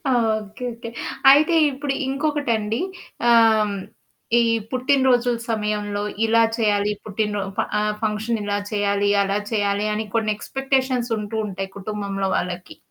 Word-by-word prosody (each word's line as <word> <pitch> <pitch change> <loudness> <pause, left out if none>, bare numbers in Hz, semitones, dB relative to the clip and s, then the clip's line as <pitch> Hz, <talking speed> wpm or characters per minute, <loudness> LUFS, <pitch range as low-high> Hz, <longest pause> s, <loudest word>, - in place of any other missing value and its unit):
Okay, 220 0 -1
okay. 230 0 -8 0.4
అయితే 310 +4 +5 0.2
ఇప్పుడు 275 +1 -3
ఇంకొకటి 290 -1 -1
అండి 215 +2 -2 0.5
ఆహ్, 235 -1 +7 0.2
హ్మ్, 210 -1 0 0.7
ఈ - - +3 0.3
పుట్టిన 260 +2 +2
రోజుల 245 -1 +2
సమయంలో 210 -1 -2 0.2
ఇలా 230 +1 +4
చేయాలి 210 -2 +2
పుట్టినరో 205 -1 -1
ప - - +3 0.2
ఆహ్, 210 0 0
"ఫంక్షన్ 220 +1 -1
ఇలా 205 0 -1
చేయాలి, 200 -1 +1
అలా 195 +1 0
చేయాలి" 205 0 +1
అని 220 0 -2
కొన్ని 215 -1 +1
ఎక్స్పెక్టేషన్స్ 260 -2 -1
ఉంటూ 210 +1 -4
ఉంటాయి 195 0 -5
కుటుంబంలో 195 -1 -3
వాళ్ళకి. 180 0 -5
215 Hz, 135 wpm, -22 LUFS, 205-245 Hz, 0.7 s, ఆహ్